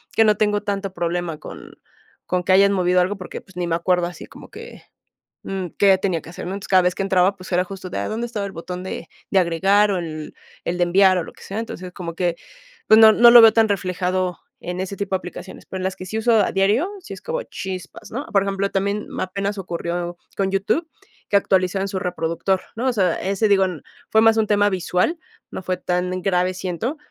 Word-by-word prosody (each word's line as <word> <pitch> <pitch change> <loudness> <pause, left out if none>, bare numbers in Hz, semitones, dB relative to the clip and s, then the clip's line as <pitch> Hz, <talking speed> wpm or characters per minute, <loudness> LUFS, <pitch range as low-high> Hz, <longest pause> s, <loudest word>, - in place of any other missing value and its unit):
que 225 - +6
no 210 -1 +4
tengo 210 0 +1
tanto 195 -2 -3
problema 175 -2 -2
con 155 - -11 0.5
con 180 0 0
que 185 - 0
hayan 200 +1 +6
movido 180 -1 +3
algo 190 +3 -1
porque, 185 - -7
pues, 195 - -21
ni 180 -1 -2
me 165 - +1
acuerdo 175 +1 +1
así 175 - -9
como - - -14
que, - - -11 0.6
mm, 190 -2 -4
qué 195 -2 +5
tenía 185 -4 -1
que - - -13
hacer, 170 - -8
¿no? 185 - -4
Entonces, 200 0 -7
cada 185 -1 +6
vez 180 0 +1
que - - -2
entraba, 190 0 +2
pues, 185 -1 -12
era 180 +1 +2
justo 190 -1 -8
ya, 100 0 -2
¿dónde 235 +2 -3
estaba 210 -4 -4
el 195 - -7
botón 180 +2 -6
de 185 -3 -6 0.2
de 195 - +3
agregar, 195 +4 +3
o 190 - 0
el 155 -3 -6 0.3
el 175 - -2
de 175 - +3
enviar? 185 +1 +4
O 175 - -1
lo - - -12
que - - -16
sea, 200 +3 -5
entonces, 185 -5 -6
como 170 -2 -7
que, 175 -1 -1 0.5
pues, 220 - +7
no 220 0 +9
no 235 +2 +7
lo 240 0 +10
veo 225 -1 +9
tan 225 -1 +4
reflejado 185 -2 -1 0.2
en 180 +1 -5
ese 190 +1 -4
tipo 200 -1 -2
de - - +3
aplicaciones, 185 +1 -10
pero, 190 - -6
en - - -4
las 190 0 -2
que 185 - -8
sí 215 +4 -4
uso 230 +2 +2
a 220 - +3
diario, 205 - +2
sí 370 - -9
es - - -10
como 485 +1 -3
chispas, 185 - -7
¿no? 265 +6 -4
Por 200 -2 +3
ejemplo, 195 0 -1
también 200 +2 -1
apenas 200 +2 -2
ocurrió 175 -1 -4 0.2
con 195 -1 +1
YouTube, 200 - 0 0.4
que - - +1
actualizan 190 0 +1
su 190 - -3
reproductor, 180 +1 -1
¿no? 240 +4 -2
O 255 - +2
sea, 185 -6 +1
ese, 200 +3 0
digo, 195 -1 +4 0.5
fue 220 - +5
más 225 0 +5
un 220 -1 +2
tema 205 0 +3
visual, 185 - 0 0.3
no - - -5
fue 185 0 -1
tan 180 +1 -2
grave, 180 -1 +1
siento. 185 - -3
190 Hz, 230 wpm, -21 LUFS, 180-205 Hz, 0.6 s, lo